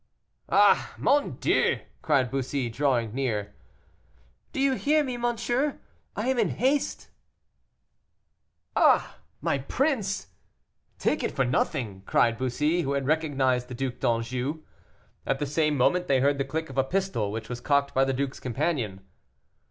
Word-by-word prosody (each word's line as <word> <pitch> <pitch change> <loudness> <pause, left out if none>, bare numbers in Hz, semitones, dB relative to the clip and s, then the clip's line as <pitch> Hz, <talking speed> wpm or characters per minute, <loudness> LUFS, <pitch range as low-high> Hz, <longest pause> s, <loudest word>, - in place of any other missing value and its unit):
"Ah, - - +4
mon 290 0 +2
Dieu!" - - +2 0.2
cried 135 -5 +2
Bussy, 135 -1 -2
drawing 120 -4 0
near. 110 -6 -2 1.0
"Do - - -4
you 270 0 +3
hear 300 +4 +2
me, 255 -3 -3
monsieur? 240 +4 0 0.4
I 210 +4 -2
am 260 -2 +1
in - - +2
haste." 270 +3 0 1.7
"Ah! - - +3 0.2
my - - 0
prince, 220 - -1 0.7
take - - 0
it - - 0
for 135 - +2
nothing," 120 -5 -1
cried 115 -1 +2
Bussy, 150 +7 +1
who 140 -3 -1
had 140 -1 -1
recognized 135 -5 +1
the 125 - -7
Duc 130 0 -3
d'Anjou. 125 +6 -1 0.6
At 135 - +1
the 145 - -2
same 150 +1 +1
moment 180 +8 +2
they 135 -2 +3
heard 140 +1 +2
the 135 - 0
click 160 +2 -4
of 135 - -2
a - - +4
pistol, 175 - -1
which 110 0 -5
was 120 0 -6
cocked 140 -1 +1
by 135 - +3
the 135 - +1
duke's 135 +1 -3
companion. 125 - -2
140 Hz, 150 wpm, -27 LUFS, 125-175 Hz, 1.7 s, Ah